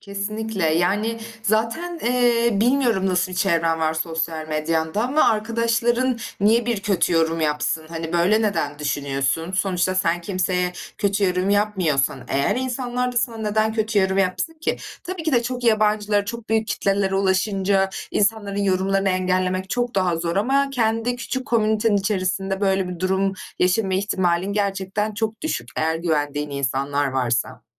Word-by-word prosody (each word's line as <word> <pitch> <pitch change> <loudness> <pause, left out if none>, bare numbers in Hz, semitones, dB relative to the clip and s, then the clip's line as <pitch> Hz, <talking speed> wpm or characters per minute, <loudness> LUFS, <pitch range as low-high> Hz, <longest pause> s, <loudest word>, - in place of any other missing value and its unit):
Kesinlikle, 205 0 -3
yani, 210 +7 +1 0.2
zaten, 230 - -1
eee, 240 -1 +3
bilmiyorum 240 -6 +2
nasıl 185 0 0
bir - - -5
çevren 165 -3 +1
var 160 0 +1
sosyal 160 -1 -3
medyanda 160 +4 -1
ama 270 +6 +3
arkadaşların 230 +3 +1 0.2
niye 225 +3 +3
bir 235 -4 0
kötü 195 -3 +1
yorum 165 0 +2
yapsın? 150 +1 -1
Hani, 165 0 -5
böyle 190 +6 +3
neden 195 -8 -1
düşünüyorsun? 145 +3 -1
Sonuçta 185 -1 0
sen 175 -2 +1
kimseye 180 -1 -1 0.3
kötü 200 0 +1
yorum 185 +1 +1
yapmıyorsan, 185 -11 +1
eğer 140 - +1
insanlar 250 -1 -2
da - - -11
sana 235 -1 0
neden 215 0 0
kötü 220 -1 0
yorum 190 0 +2
yapsın 195 - 0
ki? - - 0 0.3
Tabii 360 -2 -5
ki 315 -2 -1
de 240 -1 +4
çok 250 0 -4
yabancılara, 210 -2 +2
çok 230 +1 -7
büyük 220 0 +1
kitlelere 195 -1 0
ulaşınca 195 0 +1 0.2
insanların 205 -1 0
yorumlarını 195 0 +1
engellemek 185 0 0
çok 245 0 -1
daha 185 -3 +1
zor 170 +2 -2
ama 275 +6 +2
kendi 230 -1 0
küçük 260 +1 -4
komünitenin 220 -2 +2
içerisinde 195 -1 -1
böyle 195 -2 +1
bir 180 -1 -6
durum 190 +1 +1 0.3
yaşama 185 +1 +2
ihtimalin 190 -1 0
gerçekten 200 +1 -1
çok 220 +1 -3
düşük, 315 - -3
eğer 160 +1 +1
güvendiğin 150 -3 -1
insanlar 140 +1 -1
varsa. 125 -2 -1
195 Hz, 150 wpm, -22 LUFS, 170-220 Hz, 0.3 s, de